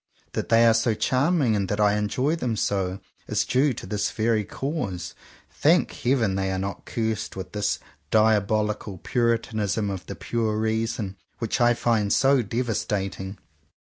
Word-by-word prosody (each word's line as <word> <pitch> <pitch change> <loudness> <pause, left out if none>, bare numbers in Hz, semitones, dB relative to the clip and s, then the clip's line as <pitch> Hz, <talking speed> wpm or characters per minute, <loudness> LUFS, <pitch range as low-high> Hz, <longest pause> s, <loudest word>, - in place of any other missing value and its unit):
That - - -3
they 115 0 +6
are 115 - +6
so 115 0 +2
charming 130 0 +2
and 100 -2 -1
that 105 - -1
I 105 -1 +4
enjoy 125 +9 0
them 125 -8 -2
so, 95 -2 -1 0.3
is - - 0
due 135 +3 +3
to - - -7
this 100 +2 -1
very 110 -1 +1
cause. 100 - -4 0.4
Thank - - +3
Heaven 120 -6 +1
they 95 0 -1
are 95 - -1
not 95 +1 -4
cursed 110 -2 -2
with 95 -1 -6
this 105 -1 0 0.3
diabolical 105 -1 +2
Puritanism 110 -2 0
of 95 -3 -5
the - - -5
pure 110 -2 -1
reason, 110 -2 -1 0.2
which 115 +1 -2
I 120 0 +5
find 110 -4 +1
so 135 -1 +4
devastating! 105 -4 -2
110 Hz, 155 wpm, -25 LUFS, 100-120 Hz, 0.4 s, they